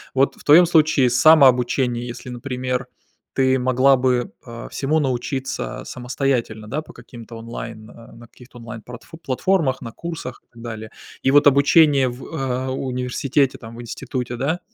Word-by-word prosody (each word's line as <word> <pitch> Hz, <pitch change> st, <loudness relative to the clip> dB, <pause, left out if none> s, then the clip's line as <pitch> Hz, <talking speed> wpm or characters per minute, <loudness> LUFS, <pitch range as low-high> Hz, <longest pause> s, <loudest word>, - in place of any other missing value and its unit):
Вот 135 Hz, +1 st, +2 dB
в -, -, -17 dB
твоем 160 Hz, +4 st, +7 dB
случае 155 Hz, -6 st, +3 dB
самообучение, 125 Hz, -3 st, +4 dB
если, 120 Hz, +1 st, -8 dB
например, 125 Hz, +1 st, -4 dB, 0.5 s
ты 130 Hz, 0 st, +2 dB
могла 130 Hz, +2 st, +4 dB
бы, 125 Hz, -1 st, 0 dB
а, 115 Hz, -1 st, -8 dB
всему 150 Hz, +3 st, 0 dB
научиться 130 Hz, -1 st, -3 dB
самостоятельно, 125 Hz, -4 st, -2 dB
да, 150 Hz, +6 st, -2 dB
по -, -, -14 dB
каким-то 115 Hz, -2 st, -12 dB
онлайн, 115 Hz, -1 st, -8 dB
а, 115 Hz, -1 st, -15 dB
на 120 Hz, +1 st, -14 dB
каких-то 125 Hz, +1 st, -17 dB
онлайн 115 Hz, -1 st, -9 dB
пратфу 125 Hz, +8 st, -12 dB
платформах, 155 Hz, -1 st, 0 dB
на 115 Hz, -3 st, -8 dB
курсах 165 Hz, -7 st, -7 dB
и -, -, -47 dB
так 115 Hz, -, -14 dB
далее. 110 Hz, -2 st, -7 dB, 0.3 s
И 135 Hz, -, +3 dB
вот 145 Hz, +1 st, +6 dB
обучение 140 Hz, -1 st, +5 dB
в, 125 Hz, +2 st, -9 dB
а, 130 Hz, -4 st, -3 dB
университете, 130 Hz, +1 st, -1 dB
там, 115 Hz, 0 st, -11 dB
в -, -, -7 dB
институте, 125 Hz, +1 st, -5 dB
да, 140 Hz, +8 st, -1 dB
130 Hz, 160 wpm, -21 LUFS, 120-140 Hz, 0.5 s, твоем